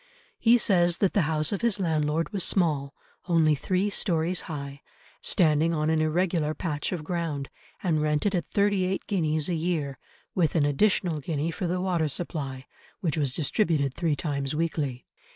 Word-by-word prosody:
He 235 Hz, +1 st, +5 dB
says 175 Hz, -6 st, +3 dB
that 195 Hz, -, +1 dB
the 200 Hz, -, +3 dB
house 155 Hz, -1 st, +1 dB
of 200 Hz, -, -2 dB
his 235 Hz, -4 st, +2 dB
landlord 160 Hz, -2 st, 0 dB
was 195 Hz, -3 st, 0 dB
small, 150 Hz, -7 st, 0 dB, 0.3 s
only 165 Hz, -3 st, +4 dB
three 185 Hz, +7 st, 0 dB
storeys 175 Hz, -2 st, +1 dB
high, 140 Hz, -2 st, -6 dB, 0.4 s
standing 165 Hz, -2 st, +2 dB
on 155 Hz, 0 st, +1 dB
an 160 Hz, -1 st, +2 dB
irregular 155 Hz, -1 st, 0 dB
patch 150 Hz, -4 st, -2 dB
of 175 Hz, -5 st, -3 dB
ground, 160 Hz, -4 st, -3 dB, 0.3 s
and 160 Hz, -5 st, +1 dB
rented 150 Hz, +6 st, +1 dB
at 175 Hz, -3 st, -1 dB
thirty 200 Hz, -2 st, +2 dB
eight 190 Hz, +1 st, -2 dB
guineas 155 Hz, -6 st, 0 dB
a 180 Hz, -, -1 dB
year, 160 Hz, -5 st, -2 dB, 0.3 s
with 170 Hz, -4 st, +1 dB
an 150 Hz, -3 st, +3 dB
additional 170 Hz, +1 st, +2 dB
guinea 150 Hz, +2 st, -2 dB
for 180 Hz, +2 st, -3 dB
the 180 Hz, +1 st, -1 dB
water 180 Hz, -4 st, 0 dB
supply, 140 Hz, -4 st, -4 dB, 0.4 s
which 165 Hz, -6 st, 0 dB
was 140 Hz, -5 st, 0 dB
distributed 150 Hz, -4 st, +1 dB
three 160 Hz, -1 st, 0 dB
times 140 Hz, -2 st, -2 dB
weekly. 150 Hz, -6 st, -2 dB
160 Hz, 170 wpm, -27 LUFS, 150-180 Hz, 0.4 s, He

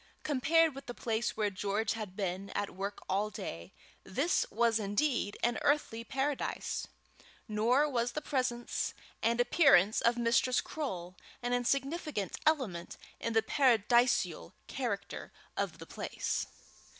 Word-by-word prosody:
Compared 315 Hz, +3 st, +3 dB
with 275 Hz, +1 st, -10 dB
the 245 Hz, -, -5 dB
place 225 Hz, -1 st, -1 dB
where 210 Hz, -2 st, +1 dB
George 205 Hz, +3 st, -1 dB
had 215 Hz, -5 st, -6 dB
been 195 Hz, -1 st, -3 dB
at 205 Hz, -, -1 dB
work 200 Hz, +2 st, -5 dB
all 200 Hz, +3 st, +1 dB
day, 85 Hz, -, -7 dB, 0.3 s
this 285 Hz, -, +1 dB
was 230 Hz, +1 st, +2 dB
indeed 205 Hz, +1 st, 0 dB
an 240 Hz, -1 st, +2 dB
earthly 285 Hz, -6 st, +1 dB
paradise. 270 Hz, +3 st, -2 dB, 0.6 s
Nor 235 Hz, +7 st, +3 dB
was 245 Hz, -4 st, 0 dB
the -, -, -1 dB
presence 255 Hz, -4 st, -1 dB, 0.3 s
and 235 Hz, +1 st, +2 dB
appearance 245 Hz, -, +5 dB
of 235 Hz, +1 st, +3 dB
Mistress 240 Hz, +2 st, +3 dB
Croale 185 Hz, -, -4 dB, 0.3 s
an 245 Hz, 0 st, 0 dB
insignificant 275 Hz, -, -1 dB
element 240 Hz, -, 0 dB, 0.2 s
in 230 Hz, -, -2 dB
the 225 Hz, 0 st, +4 dB
paradisial 240 Hz, -, +3 dB
character 235 Hz, -7 st, -4 dB, 0.2 s
of -, -, -2 dB
the -, -, -9 dB
place. -, -, -3 dB
235 Hz, 130 wpm, -32 LUFS, 205-270 Hz, 0.6 s, appearance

